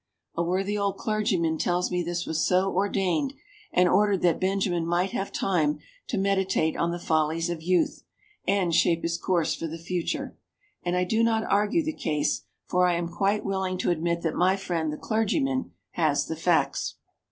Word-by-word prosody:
A 170 - -1
worthy 190 +4 0
old 200 -1 0
clergyman 195 -7 0
tells 180 +1 0
me 180 0 0
this 175 0 -2
was 160 0 -1
so 190 +1 +2
ordained 195 - 0 0.4
and 180 0 +4
ordered 200 +1 +3
that 175 -2 +3
Benjamin 185 -2 0
might 175 +3 0
have 195 - -3
time 155 -6 +1 0.3
to 230 - -2
meditate 190 -4 +1
on 170 - 0
the 170 - -2
follies 165 0 0
of 165 -2 -4
youth 180 +1 +1 0.5
and 190 -4 +2
shape 165 +1 +3
his 170 0 -1
course 175 -3 +1
for 165 - -4
the 165 +1 -6
future, 175 +1 -3 0.5
and 175 0 -1
I 180 - +2
do 220 +5 +1
not 225 -1 +2
argue 210 +12 +2
the 315 +1 -2
case, 150 - -1 0.2
for 180 0 +2
I 175 - +2
am 170 0 -2
quite 195 +4 0
willing 190 -1 -1
to 180 - +1
admit 170 0 -1
that 160 -2 0
my 185 +2 +3
friend, 170 -5 -2
the 150 - -5
clergyman, 260 +5 0 0.2
has - - +1
the - - -4
facts. - - +1
180 Hz, 185 wpm, -26 LUFS, 170-195 Hz, 0.5 s, and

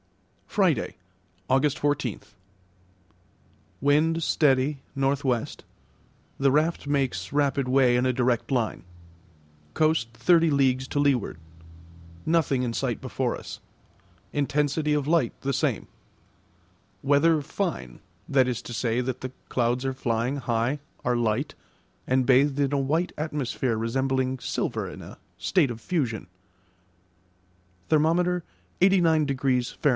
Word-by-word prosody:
Friday, - - +1 0.5
August 135 +2 +2
14. 145 -6 -1 1.6
Wind 155 +4 +3
steady, 140 -2 +2 0.2
N.W. 135 -3 +1 0.9
The 135 -1 +3
raft 155 +2 +1
makes 130 -11 -1
rapid 140 -2 +1
way 130 -2 +4
in 125 +1 +2
a 130 - +3
direct 125 0 0
line. 120 -4 -1 0.9
Coast 155 -7 +2
thirty 165 +8 +4
leagues 130 -2 +1
to 145 - -1
leeward. 135 - +1 0.9
Nothing 155 -6 +2
in 120 -2 -2
sight - - -2
before - - -2
us. - - -9 0.7
Intensity 150 +1 0
of 145 -1 0
light 160 -7 +2
the 140 0 -1
same. - - -1 1.2
Weather 145 +3 +3
fine; 155 - -4 0.3
that 130 -2 +3
is 125 -3 -2
to 120 - -7
say, 115 +1 0
that 125 0 -3
the 130 - -5 0.2
clouds 125 +1 0
are 135 - 0
flying 120 +1 -1
high, 120 +2 -1 0.3
are 125 0 +2
light, 120 +5 0 0.5
and 130 0 +2
bathed 135 +2 +4
in 140 0 +1
a 140 - +2
white 155 +6 0
atmosphere 135 -6 -2
resembling 130 +3 -1
silver - - -2
in - - -10
a - - -11 0.2
state 175 -8 +2
of 115 - -7
fusion. 120 - -2 1.6
Therm. 175 +3 +2 0.4
89° 150 -9 +2
Fahr. 145 - +2
135 Hz, 120 wpm, -26 LUFS, 125-150 Hz, 1.6 s, way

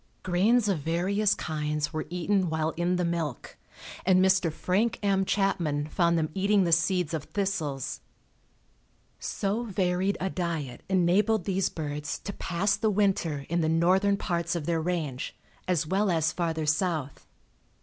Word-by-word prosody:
Grains 210 +6 +3
of 190 -6 +1
various 185 +7 +1
kinds 150 -1 -2
were 155 - -3
eaten 180 +1 0
while 160 0 0
in 175 +2 0
the 180 -1 0
milk, 165 -6 -3 0.5
and 185 0 +4
Mr. 190 -2 +3
Frank 205 +8 0
M. 195 -1 +2
Chapman 170 -8 0
found 170 0 +2
them 155 -1 -1
eating 200 +1 +3
the 170 - 0
seeds 170 0 +2
of 155 -3 -3
thistles. 160 -9 -3 1.2
So 200 +3 -2
varied 190 -3 0
a 190 0 -2
diet 160 -8 -3
enabled 190 +4 +3
these 195 -1 0
birds 150 -2 -4
to 200 - -7
pass 195 +4 0
the 220 +1 0
winter 190 -8 0
in 170 +1 0
the 160 - +1
northern 185 +5 +3
parts 170 -2 -1
of 165 -4 -3
their 165 -1 0
range 155 -6 -3 0.3
as 175 -4 +1
well 195 +5 +1
as 160 -3 +2
farther 165 -3 -1
south. 155 -2 -1
175 Hz, 150 wpm, -28 LUFS, 160-195 Hz, 1.2 s, and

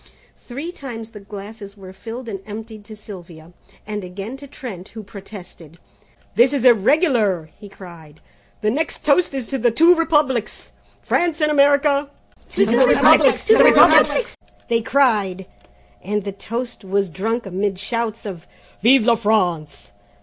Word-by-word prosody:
Three 280 +8 -7
times 235 -9 -9
the 210 - -11
glasses 205 0 -11
were 190 -1 -12
filled 230 +6 -9
and 200 -3 -5
emptied 215 0 -9
to 215 - -11
Sylvia, 175 -6 -13 0.3
and 210 -1 -5
again 195 +7 -8
to 280 +1 -12
Trent, 225 -10 -9
who 220 -1 -10
protested. 190 -5 -13 0.6
"This 245 +7 +3
is 265 -3 -1
irregular," 225 - +2
he 205 -1 -12
cried, 165 -6 -14 0.4
"the 215 - 0
next 315 +6 -4
toast 295 0 +2
is 265 -3 -4
to 270 +4 -4
the 240 +1 +2
twin 330 +9 +4
Republics, 295 -8 -1 0.3
France 340 -3 0
and 305 -1 +1
America?" 285 0 +2 0.4
"To 200 - +1
the 235 +4 +3
Republics! 250 - +4
To 445 +1 +5
the - - +8
Republics!" - - +5 0.3
they 230 -1 +1
cried, 210 -8 +1 0.6
and 210 +2 -2
the 200 - -5
toast 230 +4 -7
was 195 +1 -1
drunk 225 +7 -3
amid 195 +1 -3
shouts 230 +2 -4
of 180 -4 -8 0.3
"Vive 240 +1 +4
a 235 - +5
France! 185 -9 -1
220 Hz, 150 wpm, -20 LUFS, 195-265 Hz, 0.6 s, the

